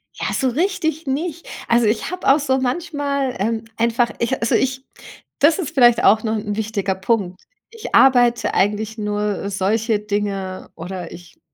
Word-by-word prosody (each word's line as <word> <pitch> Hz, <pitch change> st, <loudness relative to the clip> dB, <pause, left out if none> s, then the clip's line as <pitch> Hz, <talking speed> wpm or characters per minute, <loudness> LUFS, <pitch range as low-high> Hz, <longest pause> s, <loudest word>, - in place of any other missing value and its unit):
Ja, -, -, -3 dB
so 265 Hz, -, +1 dB
richtig 320 Hz, +1 st, -1 dB
nicht. 315 Hz, +5 st, -3 dB, 0.2 s
Also, 235 Hz, 0 st, +3 dB
ich 215 Hz, +9 st, -1 dB
habe 365 Hz, 0 st, -5 dB
auch 285 Hz, -, +4 dB
so 265 Hz, -2 st, +1 dB
manchmal, 280 Hz, -1 st, -2 dB
ähm, 225 Hz, +2 st, -1 dB
einfach 235 Hz, +1 st, +1 dB
ich 260 Hz, +3 st, -1 dB
also, 230 Hz, -, 0 dB
ich 265 Hz, 0 st, -1 dB, 0.5 s
das 305 Hz, +3 st, +4 dB
ist 365 Hz, -8 st, -4 dB
vielleicht 240 Hz, -3 st, +5 dB
auch 215 Hz, +1 st, +5 dB
noch 220 Hz, -1 st, -1 dB
'n 210 Hz, -1 st, -4 dB
wichtiger 210 Hz, -3 st, -2 dB
Punkt. 190 Hz, -2 st, -1 dB, 0.3 s
Ich 455 Hz, -1 st, -5 dB
arbeite 245 Hz, -2 st, +4 dB
eigentlich 210 Hz, +3 st, 0 dB
nur 210 Hz, -1 st, -2 dB
solche 210 Hz, +3 st, 0 dB
Dinge 200 Hz, -2 st, -3 dB
oder 175 Hz, 0 st, -7 dB
ich 175 Hz, -1 st, -13 dB
230 Hz, 160 wpm, -20 LUFS, 205-270 Hz, 0.5 s, vielleicht